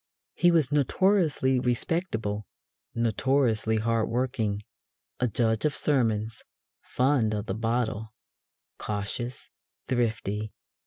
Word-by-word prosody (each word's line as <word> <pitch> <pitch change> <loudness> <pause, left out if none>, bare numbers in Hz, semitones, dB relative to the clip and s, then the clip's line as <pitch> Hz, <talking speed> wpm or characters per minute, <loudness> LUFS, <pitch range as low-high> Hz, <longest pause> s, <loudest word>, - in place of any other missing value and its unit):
He 175 - +4
was 160 -5 +3
notoriously 150 -3 +2
respectable, 120 - -1 0.5
notoriously 115 -1 +1
hard 115 0 +1
working, 115 -4 -1 0.6
a 125 - +2
judge 110 -1 0
of 150 - +1
sermons, 110 -6 0 0.4
fond 125 -5 +1
of 105 0 -3
the 95 - -2
bottle, 110 0 -1 0.7
cautious, 110 +4 -4 0.4
thrifty. 110 -4 -1
115 Hz, 95 wpm, -27 LUFS, 110-130 Hz, 0.7 s, He